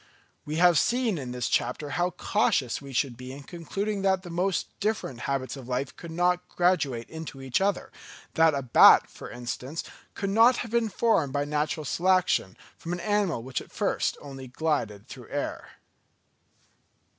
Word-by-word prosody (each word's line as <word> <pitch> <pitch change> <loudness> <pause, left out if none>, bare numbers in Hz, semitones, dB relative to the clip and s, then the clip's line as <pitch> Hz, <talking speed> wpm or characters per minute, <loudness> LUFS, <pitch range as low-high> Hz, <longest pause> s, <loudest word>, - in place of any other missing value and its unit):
We 150 - -4
have 175 -2 +5
seen 235 -7 +1
in 125 -3 -5
this 125 -1 -2
chapter 145 -2 -1
how 175 +4 +1
cautious 160 - 0
we 140 -1 -10
should 130 -1 0
be 125 +1 -9
in 140 +1 -9
concluding 195 +6 -4
that 190 -1 +2
the 175 - -8
most 180 +2 0
different 210 - -2
habits 135 -1 -2
of 130 -3 -10
life 130 +1 -2
could 170 - -10
not 180 +2 0
graduate 150 -10 +1
into 160 -4 -8
each 135 +4 -1
other; 200 -1 0 0.4
that 160 -2 +4
a 140 - -2
bat, 125 - +7
for - - -10
instance, 125 +5 -5 0.3
could 195 -1 -2
not 230 +4 +6
have 225 - -10
been 235 -1 +1
formed 190 - +1
by 145 0 0
natural 150 +1 -1
selection 185 - +1 0.2
from 170 - -5
an 175 - -3
animal 205 - 0
which 130 0 -3
at - - -14
first - - -1
only 135 -2 -8
glided 125 -7 -2
through - - -10
the - - -8
air. - - -3
160 Hz, 175 wpm, -27 LUFS, 135-185 Hz, 0.4 s, bat